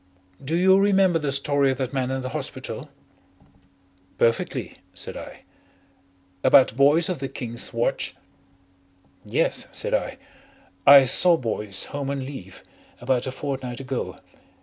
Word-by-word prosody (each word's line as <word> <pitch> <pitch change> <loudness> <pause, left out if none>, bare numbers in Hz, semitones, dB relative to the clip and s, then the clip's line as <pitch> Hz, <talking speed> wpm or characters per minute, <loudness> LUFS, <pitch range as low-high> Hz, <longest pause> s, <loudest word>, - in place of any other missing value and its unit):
Do 155 +5 -2
you 190 +2 +5
remember 195 -4 +3
the 145 -3 -2
story 140 0 +1
of 130 - -1
that 130 0 -3
man 130 -2 -1
in 130 0 -2
the 130 - -4
hospital?" - - -6 1.3
"Perfectly," 115 0 -1 0.2
said - - -5
I. - - -10 1.0
"About 130 -4 +5
Boyce 145 +5 +4
of 180 -5 -3
the 135 - -3
King's 120 -3 -4
Watch?" - - -2 1.1
"Yes," - - -1
said - - -3
I. - - -1 0.7
"I 140 -1 +10
saw 170 +6 +5
Boyce, 105 -6 -3
home 140 -1 -3
on 140 -2 -3
leave, 115 -10 -10 0.4
about 125 +1 0
a - - -2
fortnight 130 -2 -5
ago. 135 -1 -4
135 Hz, 135 wpm, -24 LUFS, 130-145 Hz, 1.3 s, I